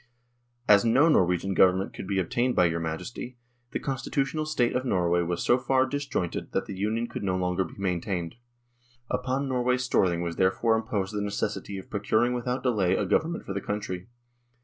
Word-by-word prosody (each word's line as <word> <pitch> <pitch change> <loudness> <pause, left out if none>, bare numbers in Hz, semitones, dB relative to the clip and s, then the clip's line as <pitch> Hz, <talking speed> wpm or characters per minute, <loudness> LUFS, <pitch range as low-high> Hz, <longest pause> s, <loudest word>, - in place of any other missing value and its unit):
" 120 - -45 0.2
As 100 -1 +7
no 125 +7 +4
Norwegian 90 - +2
Government 95 +1 +3
could - - -7
be 100 -1 -1
obtained 120 +7 0
by 90 - +5
your 85 0 0
Majesty, 100 +10 -5 0.3
the - - -2
constitutional 140 +3 -2
State 125 -6 +1
of 125 - 0
Norway 90 -7 +2
was 85 0 -2
so 120 - +4
far 130 0 +2
disjointed 140 -10 -3
that - - 0
the 100 - -6
Union 110 +4 -1
could - - -6
no 95 -2 0
longer 90 0 0
be - - -11
maintained. 90 -2 -2 0.8
Upon 135 +2 -1
Norway's 125 0 +1
Storthing 90 -8 +2
was 85 -1 -4
there 95 - +4
fore 110 +4 +1
imposed 105 -3 -2
the 105 - -1
necessity 100 0 -3
of 95 - -10
procuring 110 +4 +1
without 125 +1 -2
delay 100 -8 +2
a - - 0
Government 165 +2 0
for 95 - -4
the 100 - -3
country. 100 -3 -4
105 Hz, 190 wpm, -27 LUFS, 90-125 Hz, 0.8 s, As